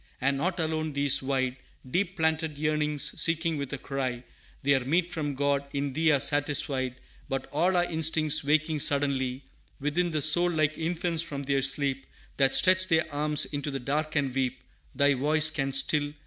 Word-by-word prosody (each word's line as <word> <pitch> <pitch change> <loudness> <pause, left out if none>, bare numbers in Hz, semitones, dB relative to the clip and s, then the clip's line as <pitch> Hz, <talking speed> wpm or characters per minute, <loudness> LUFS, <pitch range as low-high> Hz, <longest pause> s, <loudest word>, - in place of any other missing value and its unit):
"And 140 +2 +1
not 175 +6 -2
alone 155 -1 -2
these 140 -1 +5
wide, 130 -1 -2 0.3
Deep 185 +6 -1
planted 160 -1 -1
yearnings, 150 -1 0
seeking 165 -1 0
with 140 -2 -5
a 140 - -3
cry 130 -3 -4 0.4
Their 140 -1 +3
meat 165 +7 -1
from 145 -3 -3
God, 140 0 -1
in 140 -1 -3
Thee 160 +3 +1
are 140 - +3
satisfied; 140 -2 0 0.3
But 135 -1 -3
all 175 +5 +1
our 175 - +3
instincts 160 -2 +1
waking 155 +1 +1
suddenly 140 -3 0 0.4
Within 155 +5 -1
the 155 -3 +1
soul, 175 +3 +4
like 155 -2 0
infants 165 0 -1
from 145 -4 -3
their 140 0 0
sleep 135 0 0 0.3
That 135 -1 +3
stretch 185 +7 +4
their 160 -3 +2
arms 150 +1 +2
into 145 0 -5
the 135 -1 -4
dark 150 +5 -3
and 140 -3 0
weep, 130 -1 -2 0.3
Thy 140 +1 +3
voice 155 +4 +4
can 135 -3 -2
still. 145 +2 +2
145 Hz, 175 wpm, -27 LUFS, 135-160 Hz, 0.4 s, these